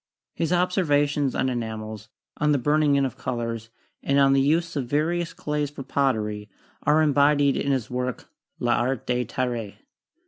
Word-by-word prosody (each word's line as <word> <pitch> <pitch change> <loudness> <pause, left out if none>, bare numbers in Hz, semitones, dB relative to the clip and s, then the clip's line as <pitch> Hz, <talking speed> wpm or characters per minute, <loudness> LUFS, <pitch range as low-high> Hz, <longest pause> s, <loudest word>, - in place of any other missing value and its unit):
His 165 0 -2
observations 150 -6 +1
on - - +1
enamels, 110 -3 -5 0.3
on 150 0 +2
the - - +3
burning 145 +2 +2
in 140 -1 +3
of 130 -2 -4
colors, 115 -3 -4 0.3
and 140 - +1
on 135 -1 +5
the 135 - +4
use 160 +5 +1
of 135 -4 -2
various 165 +5 0
clays 150 -1 -2
for 140 -1 -8
pottery, 105 -7 -1 0.3
are 150 +2 +3
embodied 145 -1 +3
in 140 - 0
his 130 -5 0
work, 125 -1 -3 0.3
'L'Art 120 +1 0
de 125 0 0
Terre.' 120 -3 -3
135 Hz, 160 wpm, -25 LUFS, 120-150 Hz, 0.3 s, on